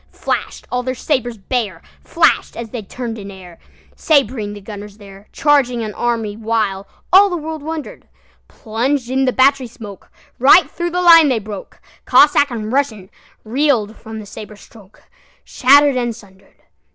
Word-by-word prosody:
Flash'd - - -4
all 250 - -1
their 255 +1 -4
sabres 245 -4 -2
bare, 205 -4 -3 0.2
Flash'd - - +1
as 230 -2 -7
they 240 - -5
turn'd 230 +2 -7
in 200 - -9
airSabring 205 - -3
the - - -9
gunners 205 0 -10
there, 200 -1 -15
Charging 270 -5 +1
an 215 -1 -5
army, 225 -3 -2
whileAll 215 -3 -2 0.4
the 355 - -2
world 315 -1 -6
wonder'd:Plunged 270 -4 -5
in 265 +1 +1
the 255 - +2
battery 265 0 +2
smokeRight 235 - 0
thro' 345 0 -3
the 360 +1 -2
line 330 -3 +7
they 255 - +1
broke; 210 -2 -9 0.3
Cossack 290 -1 +5
and 225 -2 -5
RussianReel'd 230 0 -2
from 220 -1 -9
the 215 - -9
sabre 210 +1 -10
strokeShatter'd 255 +7 0
and 240 -2 -2
sunder'd. 195 -4 -20
235 Hz, 140 wpm, -17 LUFS, 210-275 Hz, 0.4 s, line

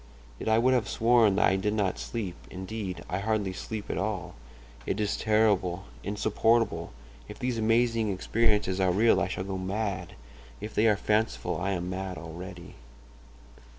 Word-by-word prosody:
Yet - - -2
I 110 - +5
would 125 +3 +4
have 125 -3 +1
sworn 115 -3 +4
that 100 - +4
I 95 - +3
did 105 +2 0
not 100 -4 0
sleep—indeed, 95 -1 -5
I 90 - -2
hardly 105 -2 0
sleep 105 +3 -6
at - - -2
all. 95 -3 -3 0.5
It 95 - -1
is 105 -1 0
terrible, 100 -4 +2 0.2
insupportable! 110 +3 +1 0.4
If 105 - -9
these 125 -3 -2
amazing 115 -1 +2
experiences 105 -1 +1
are 95 -1 +3
real 110 +5 +4
I - - +1
shall 95 - -3
go 95 0 -4
mad; 100 +1 -3 0.5
if 105 +1 -6
they 110 - +3
are 105 -2 +4
fanciful 105 -2 0
I 100 +1 0
am 90 0 -3
mad 95 -1 -4
already. 85 +2 -8
105 Hz, 160 wpm, -28 LUFS, 95-110 Hz, 0.5 s, I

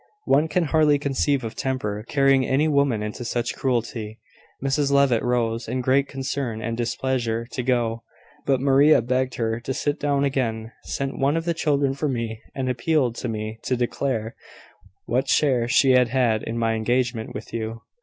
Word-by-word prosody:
One 150 +4 +3
can 180 +2 +1
hardly 155 -2 +3
conceive 140 -1 0
of 115 0 -5
temper 110 -5 -3
carrying 135 -2 +3
any 135 +4 +2
woman 140 -7 +2
into 105 +3 -5
such 120 0 -2
cruelty! 115 -4 -2 0.4
Mrs 140 +1 0
Levitt 140 -5 +4
rose, 115 -1 0
in 130 - -2
great 135 +2 +2
concern 135 -4 -3
and 115 +1 -3
displeasure, 120 -1 -1
to 125 - -3
go: 120 -2 0 0.5
but 135 -2 +3
Maria 140 0 +5
begged 130 +1 0
her 115 -1 -1
to 130 +2 -4
sit 145 0 -1
down 140 -1 +1
again, 115 -5 -1
sent 135 0 -3
one 140 +4 +2
of 165 - -3
the 170 - +1
children 145 -4 +1
for 140 +2 -2
me, 115 -3 -3
and 130 -1 -2
appealed 125 0 +1
to 125 - -3
me 110 0 -4
to 130 - -1
declare 120 -2 -2 0.7
what 130 +3 0
share 130 -6 +2
she 130 +2 +4
had 125 -1 +5
had 120 -3 +1
in 115 - -4
my 115 -1 +1
engagement 120 +1 -1
with 105 - -8
you. 115 0 -4
125 Hz, 175 wpm, -23 LUFS, 115-140 Hz, 0.7 s, Maria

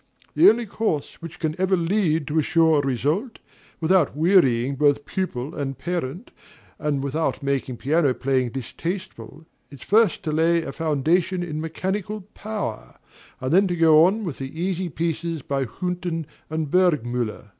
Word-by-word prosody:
The 340 - +7
only 235 +1 +1
course 200 -10 -3
which 165 -1 -8
can 155 -2 -1
ever 190 0 +3
lead 165 -3 +1
to 155 +3 0
a - - +4
sure 160 -1 +3
result, 145 - -1 0.4
without 165 -4 +2
wearying 140 -7 +3
both 145 0 +2
pupil 150 -8 -3
and 135 -3 -4
parent, 170 - -4 0.5
and 145 -3 -1
without 150 +2 -1
making 135 -3 -1
piano 145 +2 +2
playing 130 -2 0
distasteful, 145 - -6 0.2
is 140 -3 -12
first 215 -3 +3
to 155 - -2
lay 165 +2 +2
a 135 - -5
foundation 165 +4 0
in 155 -3 -4
mechanical 190 +6 -3
power, 210 - -5 0.4
and 130 +3 -2
then 195 +2 +5
to 175 - -1
go 160 -2 +6
on 205 +5 +2
with 160 -7 -5
the 135 +4 -6
easier 185 0 -1
pieces 165 -1 -3
by 135 -1 -1
Hünten 175 +3 -3 0.2
and 155 -2 -3
Burgmüller. 125 - +1
160 Hz, 155 wpm, -23 LUFS, 140-180 Hz, 0.5 s, The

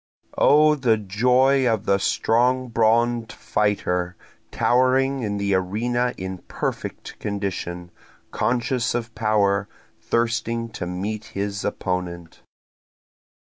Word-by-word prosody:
O 150 +1 +6
the 125 -6 +2
joy 125 +6 +3
of 110 -1 -1
the 100 -2 +2
strong 125 +5 +1
brawn'd 115 +1 +2
fighter, 90 -4 -1 0.3
towering 130 +2 +2
in 105 -3 -2
the 100 0 0
arena 120 +7 0
in 95 0 -5
perfect - - -5
condition, 90 -4 -4 0.4
conscious 125 0 0
of 115 -1 -3
power, 105 -3 +1 0.3
thirsting 115 0 -1
to 90 -5 -5
meet 105 +5 -4
his 100 0 -2
opponent. 90 -4 -4
110 Hz, 100 wpm, -23 LUFS, 100-120 Hz, 0.4 s, O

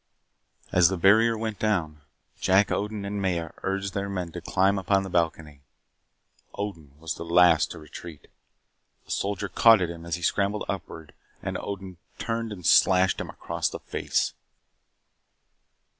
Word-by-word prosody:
As 90 -2 +5
the 95 - -2
barrier 110 +6 +5
went 110 -2 -4
down, 85 -8 -1 0.4
Jack 95 +2 +3
Odin 105 0 -2
and 100 0 -3
Maya 85 -4 -1
urged 95 0 -2
their 100 +1 -2
men 90 -3 -4
to 85 - -7
climb 95 +3 +2
upon 95 +1 +1
the 95 - -7
balcony. 80 -4 -1 0.9
Odin 80 -9 -6
was 80 -1 -4
the - - -7
last 85 -2 +4
to - - -8
retreat. 75 0 -11 0.8
A - - -11
soldier 100 0 -2
caught 115 +2 +6
at 90 -2 -1
him 85 -1 -9
as 85 -1 -2
he 90 - -8
scrambled 100 +4 0
upward 80 -5 -6 0.3
and - - -3
Odin 95 -3 -6 0.2
turned 115 -1 -3
and 90 -5 -8
slashed 95 +3 +4
him - - -6
across - - -3
the - - -6
face. - - -2
95 Hz, 155 wpm, -26 LUFS, 85-100 Hz, 0.9 s, caught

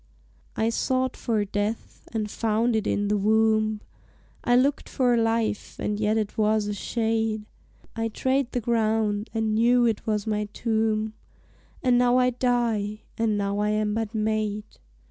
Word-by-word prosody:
I 220 +1 +1
sought 255 +2 0
for 220 -3 -1
death 205 +3 -4
and 215 -2 -2
found 225 +1 +1
it 215 -1 0
in 205 0 0
the 210 +1 +1
wombe, 215 +1 +2 0.6
I 245 - +3
lookt 270 +3 +2
for 245 -2 +2
life, 225 -2 0
and 210 0 -2
yet 215 +1 +1
it 215 0 -2
was 215 0 +2
a 205 - -2
shade, 220 0 -1 0.5
I 225 0 -1
trade 260 +3 0
the 245 - -1
ground, 220 -2 0
and 220 -1 0
knew 240 +2 +4
it 225 -2 -1
was 210 -2 0
my 210 -1 -1
tombe, 220 -1 0 0.7
And 250 -2 +4
now 245 0 +4
I 250 0 +3
die, 230 -4 0
and 225 -2 0
now 200 0 -1
I 210 0 +1
am 215 0 0
but 225 0 -3
made. 215 -1 -1
220 Hz, 160 wpm, -25 LUFS, 210-235 Hz, 0.7 s, knew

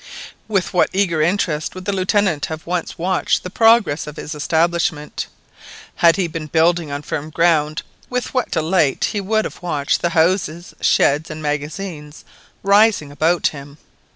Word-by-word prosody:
With 200 -3 -1
what 180 - +3
eager 180 -5 +1
interest 165 -3 0
would 185 0 -8
the 200 - -1
Lieutenant 190 -4 +1
have 160 0 -7
once 175 -1 -3
watched 185 +2 0
the 180 - -6
progress 225 -11 +3
of 150 - -8
his 155 - -6
establishment! 160 0 -1 0.7
Had 170 -1 +5
he 190 - 0
been 165 -1 -5
building 165 +1 +2
on 145 +1 -4
firm 150 +1 -4
ground, 155 -2 +1 0.3
with 250 -1 -3
what 255 -2 0
delight 160 -3 +1
would 210 +1 -1
he - - -2
have - - -14
watched 150 -5 -1
the 170 - +1
houses, 170 0 0
sheds, 145 +3 +2
and 155 0 -7
magazines 150 +1 -5 0.4
rising 200 -7 +3
around 170 +2 +2
him! 140 0 -11
165 Hz, 155 wpm, -19 LUFS, 150-185 Hz, 0.7 s, Had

